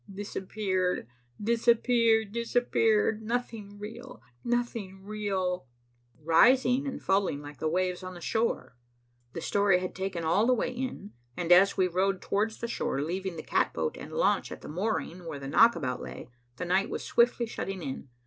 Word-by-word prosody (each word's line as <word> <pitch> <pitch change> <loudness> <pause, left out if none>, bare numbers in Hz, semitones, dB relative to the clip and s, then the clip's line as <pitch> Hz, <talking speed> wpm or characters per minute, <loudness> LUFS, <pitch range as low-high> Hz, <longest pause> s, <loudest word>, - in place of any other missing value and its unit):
"Disappeared, 190 -2 -2 0.3
disappeared, 230 -1 +3
disappeared. 225 -2 +1
Nothing 220 -3 -4
real, 235 +5 -9 0.2
nothing 230 -6 -2
real," 195 -6 -2 0.5
rising 250 - +4
and 270 - -4
falling 190 -6 +1
like 145 -2 -10
the 155 - 0
waves 180 +2 0
on 185 0 -7
the - - -9
shore. 220 - -1 0.6
The 165 - -5
story 200 0 +3
had 185 0 -4
taken 190 -2 -3
all 195 +8 +3
the 255 - +4
way 245 - -1
in, 250 -5 -5 0.3
and 175 0 -1
as 190 +3 +6
we 185 -1 +3
rowed 190 +2 0
towards 215 +2 -1
shore, 230 - -2
leaving 185 +3 -3
the 160 - -6
catboat 80 -1 0
and - - -9
launch - - +1
at - - -8
the - - -9
mooring 180 -1 -3
where 155 -3 -5
the 135 -1 -7
knockabout 150 - +3
lay, - - -8 0.3
the 180 - -4
night 185 +3 +1
was - - -4
swiftly 235 0 +2
shutting 195 -5 -5
in. 135 -1 -6
195 Hz, 160 wpm, -29 LUFS, 180-230 Hz, 0.6 s, as